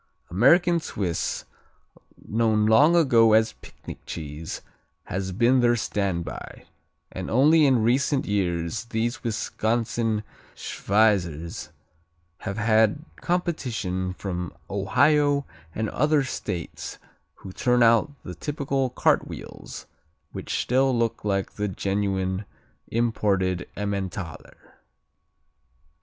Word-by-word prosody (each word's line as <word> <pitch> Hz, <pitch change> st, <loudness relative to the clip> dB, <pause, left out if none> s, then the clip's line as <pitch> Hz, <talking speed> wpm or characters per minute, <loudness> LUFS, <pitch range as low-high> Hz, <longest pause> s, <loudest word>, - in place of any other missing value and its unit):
American 170 Hz, -, +4 dB
Swiss, 95 Hz, -, -3 dB, 0.8 s
known 110 Hz, -1 st, +2 dB
long 145 Hz, +10 st, +6 dB
ago 120 Hz, -9 st, +5 dB
as 110 Hz, 0 st, +4 dB
picnic -, -, -11 dB
cheese, 80 Hz, 0 st, -6 dB, 0.4 s
has 95 Hz, 0 st, -3 dB
been 120 Hz, +7 st, +3 dB
their 120 Hz, -1 st, +4 dB
standby, 100 Hz, -6 st, -3 dB, 0.5 s
and -, -, -5 dB
only 150 Hz, +5 st, +5 dB
in 125 Hz, -5 st, +3 dB
recent 130 Hz, +4 st, +2 dB
years 90 Hz, 0 st, -1 dB
these 120 Hz, +2 st, -2 dB
Wisconsin 115 Hz, -1 st, -1 dB, 0.3 s
Schweizers 85 Hz, -7 st, 0 dB, 0.7 s
have 100 Hz, -, -5 dB
had 110 Hz, +6 st, +3 dB
competition 115 Hz, -, -2 dB
from 90 Hz, -3 st, -4 dB, 0.2 s
Ohio 145 Hz, -2 st, +3 dB, 0.3 s
and 110 Hz, 0 st, -1 dB
other 150 Hz, +1 st, +2 dB
states 90 Hz, -9 st, -5 dB, 0.4 s
who 95 Hz, -, -10 dB
turn 125 Hz, +2 st, +3 dB
out 115 Hz, +4 st, +5 dB
the 90 Hz, -, -7 dB
typical 135 Hz, -, -2 dB
cartwheels, -, -, -2 dB, 0.5 s
which -, -, -3 dB
still 130 Hz, 0 st, +2 dB
look 115 Hz, -1 st, -1 dB
like 100 Hz, -2 st, -1 dB
the 105 Hz, 0 st, -1 dB
genuine 95 Hz, 0 st, -1 dB, 0.4 s
imported 100 Hz, -6 st, 0 dB
Emmentaler. 95 Hz, -4 st, -5 dB
110 Hz, 95 wpm, -25 LUFS, 95-130 Hz, 0.8 s, long